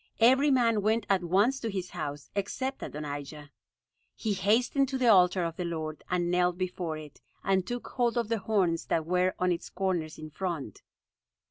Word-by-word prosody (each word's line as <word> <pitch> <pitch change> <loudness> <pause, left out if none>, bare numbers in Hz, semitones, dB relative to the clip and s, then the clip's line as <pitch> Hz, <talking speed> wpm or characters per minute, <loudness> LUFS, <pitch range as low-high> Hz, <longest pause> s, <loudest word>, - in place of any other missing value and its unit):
Every 260 +5 +5
man 235 -5 +3
went 220 +1 +1
at 190 -2 +2
once 205 +10 +2
to 230 - -3
his 190 -3 -4
house, 145 -4 -5
except 260 +7 -3
Adonijah. 145 0 -6 0.6
He 215 -2 -1
hastened 245 +7 +2
to 270 - -1
the 250 -2 +3
altar 180 -3 +5
of 165 -1 -3
the 180 - -2
Lord, 160 -2 -4
and 175 -1 0
knelt 180 0 +2
before 180 -3 -3
it, 150 -2 -11 0.2
and 190 -2 +1
took 245 0 -4
hold 240 -1 0
of 235 -2 +1
the 230 0 0
horns 190 -5 0
that 160 -1 0
were 180 +2 +1
on 180 0 +1
its 170 - -3
corners 180 -4 -2
in 155 0 -9
front. 160 - -4
185 Hz, 185 wpm, -29 LUFS, 165-225 Hz, 0.6 s, Every